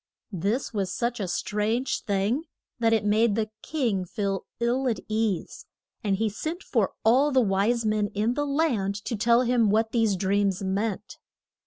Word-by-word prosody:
This 205 +10 -1
was 195 -3 -1
such 240 +3 -2
a 195 - -2
strange 215 +7 -1
thing 205 +9 0 0.3
that 230 -1 +3
it 220 -2 +2
made 215 +1 +3
the 215 -1 -1
king 235 -12 -1
feel 195 +1 -3
ill 245 +3 +1
at 225 -6 0
ease. 215 -4 -2 0.4
And 200 -2 +1
he 220 +3 0
sent 315 - -4
for - - 0
all 260 +6 +5
the 265 - +4
wise 220 +2 +1
men 215 -1 +1
in 215 +4 +1
the 290 +2 -1
land 265 -10 0
to 235 - -2
tell 235 +3 +4
him 240 -3 +3
what 220 +2 +2
these 225 -4 +2
dreams 195 0 0
meant. 200 +2 -2
220 Hz, 170 wpm, -26 LUFS, 200-240 Hz, 0.4 s, all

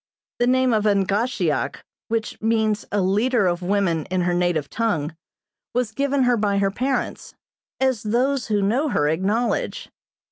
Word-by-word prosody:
The 240 - +2
name 255 -1 +3
of 215 -1 +1
Angahsheock, 205 +4 +1 0.3
which 225 -1 -3
means 220 -1 +1
a 205 - +1
leader 210 +4 +2
of 175 0 0
women 180 -4 0
in 185 0 -1
her 175 0 +1
native 175 -5 0
tongue, 165 -9 -1 0.6
was 245 -3 0
given 280 +2 +1
her 245 -1 +3
by 205 -2 +1
her 195 0 +2
parents, 255 +4 -3 0.4
as 260 -4 +1
those 250 +5 0
who 210 -2 +1
know 255 +10 +1
her 145 - +1
acknowledge. 200 +9 -1
215 Hz, 150 wpm, -22 LUFS, 190-245 Hz, 0.6 s, name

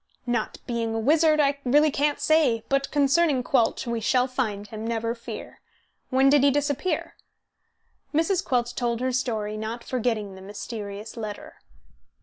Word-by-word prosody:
"Not 240 -3 -1
being 230 -2 -2
a - - 0
wizard, 305 +5 +4
I 280 -1 +2
really 295 +4 +4
can't 290 +1 0
say; 300 -8 +3
but 275 0 +1
concerning 285 -1 +3
Quelch, 245 -1 +1
we 235 -1 -2
shall 250 +3 +2
find 220 -6 -2
him, 215 +1 -7
never 230 0 -1
fear. 235 -1 -9 0.5
When 265 +1 +4
did 280 0 +5
he 280 - +6
disappear?" 290 +5 -1 1.0
Mrs. 335 +5 +1
Quelch 245 -6 0
told 235 -2 -1
her 255 +1 0
story, 220 -4 -2
not 225 +2 -5
forgetting 225 -5 -2
the 190 - -11
mysterious 205 +1 -7
letter. 215 -2 -7
245 Hz, 150 wpm, -25 LUFS, 225-280 Hz, 1.0 s, he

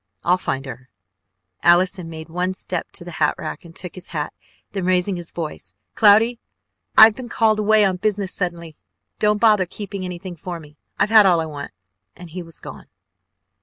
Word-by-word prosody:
I'll 180 +1 +3
find 135 -5 -3
her 130 -1 -9 0.4
" - - -55 0.3
Allison 180 0 +3
made 160 -1 -8
one 180 +3 -2
step 180 -2 -4
to 175 - -10
the 175 - -7
hat 150 - +3
rack - - -6
and 165 -1 -14
took 180 - -6
his 185 - -9
hat, 150 -3 -4 0.4
then 195 -2 -3
raising 185 +1 +1
his 175 -1 -6
voice: 150 - -7 0.2
"Cloudy, 225 +3 +5 0.6
I've 220 0 +9
been 250 -2 -8
called 220 -2 +2
away 215 0 +4
on 190 -2 0
business 200 -1 -1
suddenly. 170 -4 -4 0.4
Don't 210 0 +3
bother 210 -5 +4
keeping 200 0 -6
anything 180 0 -6
for 175 +1 -6
me, 150 -2 -15 0.2
I've 210 - +1
had 215 -3 +8
all 175 -3 +4
I 160 - -1
want 145 -2 -7 0.3
" 95 0 -55
and 175 -2 -11
he 180 +2 -5
was 165 -2 -11
gone. - - -10
180 Hz, 195 wpm, -21 LUFS, 165-205 Hz, 0.6 s, I've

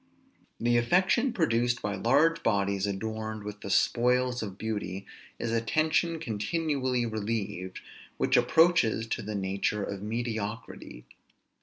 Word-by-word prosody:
The 120 +1 +2
affection 185 - +3
produced 120 - +1
by 105 - -1
large 140 +11 +3
bodies 100 -2 +1
adorned 110 +1 -4
with 105 0 -7
the - - -6
spoils 125 +4 +2
of 100 -3 -6
beauty, 105 -3 -4 0.3
is 115 - -3
a 115 0 +1
tension 155 +6 +1
continually 130 0 -1
relieved; 105 -4 -3 0.4
which - - +2
approaches 160 -10 +4
to 115 - -3
the 105 0 -5
nature 100 +1 -1
of 100 -1 -5
mediocrity. 110 - -5
115 Hz, 125 wpm, -29 LUFS, 105-125 Hz, 0.4 s, approaches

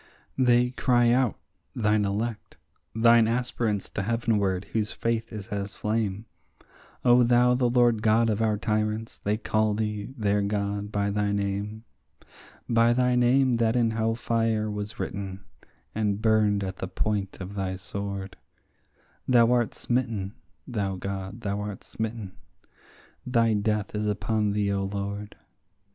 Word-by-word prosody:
They 125 -1 +4
cry 120 -2 +3
out, 125 -2 +2 0.4
thine 105 -2 +2
elect, 105 +3 -3 0.4
thine 115 0 +5
aspirants 115 -3 -1
to - - -3
heavenward, 105 -4 0
whose 110 -2 -1
faith 115 0 -2
is 105 -3 -6
as 100 -1 -4
flame; 105 -1 -2 0.8
O 125 0 +6
thou 120 +1 +4
the 125 -1 +2
Lord 120 -2 +3
God 115 +1 +3
of 110 0 0
our 110 -2 +2
tyrants, 110 +1 -2
they 105 +1 -1
call 110 -1 +1
thee, 105 +1 -3
their 105 -2 +1
God, 100 0 -2
by 100 -1 0
thy 105 0 0
name. 100 +2 -2 0.8
By 115 0 +4
thy 125 0 +2
name 125 0 +3
that 115 0 +2
in 115 -2 +2
hell 110 0 0
fire 115 -2 0
was 105 +2 -5
written, 95 0 -4 0.5
and 105 -2 0
burned 105 -2 +2
at 95 -1 -5
the 95 - -4
point 100 +1 -2
of 95 +1 -7
thy 95 -2 -2
sword, 100 0 -5 0.9
Thou 120 -2 +5
art 120 -3 +1
smitten, 115 -6 -1 0.3
thou 100 -5 -2
God, 100 +3 -5
thou 100 -1 -2
art 105 -1 -6
smitten; 110 -3 -5 0.9
thy 115 -3 +2
death 105 0 -1
is 105 0 -1
upon 105 +1 0
thee, 100 -1 0
O 100 -1 0
Lord. 100 +1 -4
105 Hz, 145 wpm, -26 LUFS, 100-115 Hz, 0.9 s, O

